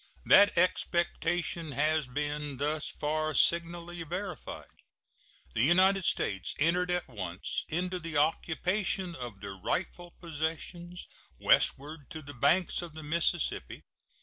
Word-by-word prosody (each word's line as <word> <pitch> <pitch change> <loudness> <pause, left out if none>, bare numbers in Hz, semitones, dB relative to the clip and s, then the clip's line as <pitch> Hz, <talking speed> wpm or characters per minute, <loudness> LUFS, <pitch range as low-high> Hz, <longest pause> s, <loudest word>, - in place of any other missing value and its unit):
That 205 -2 +6
expectation 170 -2 0
has 150 +1 +1
been 145 +1 -3
thus 150 +2 -1
far 155 0 -2
signally 170 +2 +2
verified. 180 +4 -6 0.8
The - - 0
United 185 +6 +4
States 95 -1 0
entered 175 +4 +2
at 180 0 -1
once 95 -7 -4
into 180 +3 -1
the 165 -2 -4
occupation 180 +4 0
of 120 -9 -8
their 100 -1 -6
rightful 175 - -4
possessions 170 +2 -4 0.3
westward 145 +1 +2
to 155 -1 -7
the 145 +1 -9
banks 155 +10 +2
of 170 -3 -9
the 160 - -8
Mississippi. 170 +2 0
160 Hz, 120 wpm, -30 LUFS, 145-175 Hz, 0.8 s, That